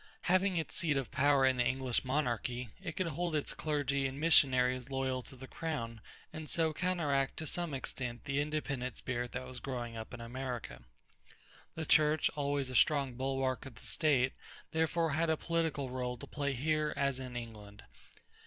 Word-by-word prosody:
Having 185 +1 +2
its 160 - -2
seat 155 -6 +2
of 135 -3 -3
power 140 -1 +4
in 130 -1 +3
the 125 - +3
English 130 0 +1
monarchy, 125 -3 -1
it - - -4
could 185 - -1
hold 170 +2 -2
its 150 - 0
clergy 140 -3 0
and 135 +1 -6
missionaries 130 -5 +4
loyal 130 -1 -1
to 130 - -11
the 130 +1 -9
crown 130 -8 -4 0.3
and 155 -1 -6
so 160 -2 +2
counteract 150 -6 0
to 160 - -3
some 175 +1 -1
extent 130 -3 -4
the 140 0 +1
independent 145 -5 -2
spirit 120 -1 -3
that 125 +1 -4
was 130 -1 -6
growing 120 -3 -4
up 110 -1 -6
in 125 - -7
America. 120 - -5 0.9
The 160 - -3
Church, 150 0 +4
always 140 -2 0
a - - -5
strong 140 -1 +4
bulwark 130 0 -1
of 130 - -11
the - - -9
state, 130 -5 +3 0.4
therefore 160 0 +1
had 160 +3 +1
a 160 - +2
political 160 -6 -1
rôle 125 -1 -3
to - - -7
play 140 -2 -2
here 150 +3 0
as 140 -2 +1
in 130 -2 -6
England. 105 -3 -8
135 Hz, 180 wpm, -33 LUFS, 125-155 Hz, 0.9 s, power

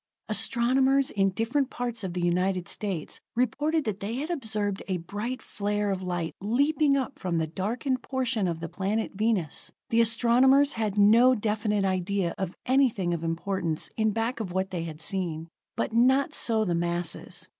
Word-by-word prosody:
Astronomers 265 +2 +2
in 195 -1 +2
different 235 +8 0
parts 240 -4 -3
of 185 -2 -3
the 180 - -2
United 180 +1 +1
States 190 -7 -4
reported 290 +6 +1
that 210 -4 -3
they 210 +3 -3
had 300 +6 -3
observed 215 - -2
a 185 -2 0
bright 205 +9 -5
flare 205 0 -1
of 190 -1 -2
light 175 -3 -3
leaping 280 +7 +2
up 270 0 -3
from 175 -2 -1
the 160 - +1
darkened 230 - -2
portion 255 -6 0
of 165 -1 -3
the 165 - -3
planet 195 +5 -2
Venus. 200 -6 -1 0.2
The 230 0 +5
astronomers 250 +5 +4
had 215 -3 -2
no 230 +5 +6
definite 210 -2 0
idea 185 -1 0
of 190 -2 -3
anything 245 -9 +2
of 170 -1 -3
importance 165 0 -2
in 220 -1 +2
back 225 +3 -1
of 205 -5 -4
what 190 +1 -1
they 170 -3 -3
had 160 -1 -8
seen; 165 -3 -2 0.3
but - - -1
not 260 +4 +3
so 220 -2 +1
the 175 - 0
masses. 170 0 -2
210 Hz, 170 wpm, -27 LUFS, 185-245 Hz, 0.3 s, no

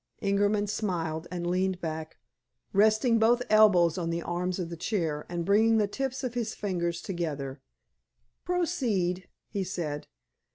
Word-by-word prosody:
Ingerman 205 +1 +2
smiled, 170 -6 -2
and 175 -1 -4
leaned 185 +1 0
back, 160 -1 -5 0.6
resting 220 +3 +4
both 240 +2 +4
elbows 190 -5 +5
on 165 -1 -2
the 170 0 -2
arms 180 +1 -2
of 175 -3 -4
the - - -4
chair, 165 -4 -2
and 170 -1 -3
bringing 220 +3 +4
the 215 - +3
tips 265 +6 -3
of 250 -2 -2
his 235 -3 -2
fingers 175 -4 -2
together. 145 -7 -4 0.8
"Proceed," 245 - 0 0.2
he 200 - -1
said. 160 -5 -4
185 Hz, 140 wpm, -28 LUFS, 170-215 Hz, 0.8 s, elbows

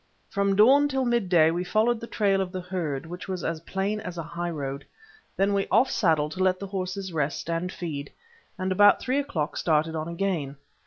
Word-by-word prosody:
From 200 -2 +1
dawn 270 +8 +6
till 265 -2 -1
mid 235 -6 +1
day 165 -3 +5
we 175 +2 -1
followed 220 +5 +1
the 230 - -7
trail 200 -4 +1
of 185 -1 -3
the 185 - -4
herd, 170 -6 -3
which 175 +4 -8
was 185 -3 -4
as 165 -1 -2
plain 195 +5 -2
as 180 -5 -7
a 165 - -3
high 170 +2 -4
road. 140 -3 -4 0.5
Then 195 +1 +2
we 195 0 0
off 240 +6 +3
saddled 150 -2 +2
to 185 +2 -2
let 185 -1 +3
the 200 - -5
horses 190 -1 -4
rest 150 +2 -2
and 170 +2 -2
feed, 150 -7 -5 0.5
and 185 0 -2
about 205 +2 +6
three 260 +2 0
o'clock 170 - -3
started 160 0 +1
on 155 0 -3
again. 170 -5 -2
185 Hz, 210 wpm, -26 LUFS, 165-200 Hz, 0.5 s, dawn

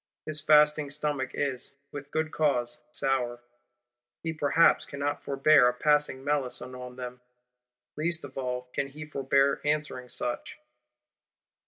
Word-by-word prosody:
His 155 0 -1
fasting 150 -1 +5
stomach 145 -2 -2
is, 135 -1 -2 0.2
with 145 0 -8
good 155 +1 -1
cause, 120 -6 0
sour; 125 -2 -1 0.8
he 165 -1 -2
perhaps 160 +2 +4
cannot 140 +1 -3
forbear 140 -1 +5
a 125 - +1
passing 150 -1 +1
malison 130 -3 -1
on 125 0 -8
them; 125 0 -7 0.7
least 160 +2 -1
of 135 -2 -10
all 125 -1 -3
can 140 - -1
he 150 +3 -9
forbear 140 -1 +1
answering 150 -4 -1
such. 120 0 -3
140 Hz, 130 wpm, -28 LUFS, 125-150 Hz, 0.8 s, fasting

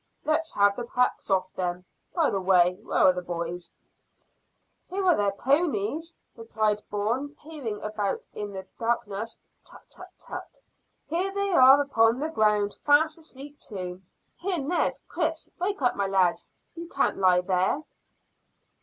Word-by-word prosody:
"Let's 315 +1 0
have 200 0 +4
the 240 - -4
packs 250 +1 0
off, 185 -1 +1
then. 180 0 -3 0.3
By 330 -4 +3
the 195 - -1
way, 180 -1 +4
where - - -3
are 185 - +7
the 180 - -4
boys?" 175 0 -5 1.1
"Here 385 +1 -2
are 355 -3 +5
their 205 -1 +1
ponies," 290 - 0 0.2
replied 215 -2 -1
Bourne, 235 +8 -2
peering 285 -9 -6
about 210 -2 -3
in 205 -1 -5
the 190 -1 -7
darkness. 225 -1 -2 0.3
"Tut, - - -13
tut, - - -11
tut! - - -9 0.5
Here 360 +5 -1
they 400 0 -1
are 270 -4 +8
upon 230 -5 +3
the 310 +3 -1
ground, 210 -6 +1
fast 310 +3 +4
asleep 290 -2 -11
too. 185 -5 -6 0.4
Here, 370 0 -1
Ned 315 +4 0
Chris! 325 -2 -2
Wake 380 -4 -2
up, 245 - +3
my 200 -1 0
lads; 190 -3 +1 0.2
you 335 0 -8
can't - - 0
lie 180 -2 +4
there." 185 +10 0
225 Hz, 150 wpm, -27 LUFS, 195-310 Hz, 1.1 s, are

